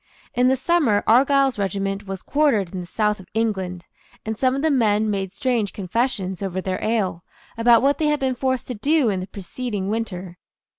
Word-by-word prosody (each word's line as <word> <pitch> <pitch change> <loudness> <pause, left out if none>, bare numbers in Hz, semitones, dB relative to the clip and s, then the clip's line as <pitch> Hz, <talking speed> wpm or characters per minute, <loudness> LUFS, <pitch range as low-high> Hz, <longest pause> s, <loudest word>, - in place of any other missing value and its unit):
In 250 +1 +3
the 260 - +4
summer 265 -7 +2
Argyle's 270 +1 +4
regiment 195 +1 -2
was 195 -1 -6
quartered 265 - +1
in 185 - -3
the 175 - -7
south 210 +2 0
of 185 - -13
England, 190 -6 -1 0.4
and 220 0 -2
some 255 +3 +1
of 275 - -2
the 320 - +3
men 215 -4 +2
made 195 -2 -2
strange 235 -3 -1
confessions, 195 -2 -2
over 190 -2 -2
their 185 0 -3
ale, 200 -6 0 0.3
about 230 +1 +5
what 280 +1 +2
they 310 - +2
had 300 0 +1
been 265 -1 0
forced 260 0 -1
to - - -2
do 275 +3 +2
in 195 -3 -1
the 185 - -5
preceding 200 +1 -5
winter. 185 -5 -4
215 Hz, 195 wpm, -22 LUFS, 195-260 Hz, 0.4 s, about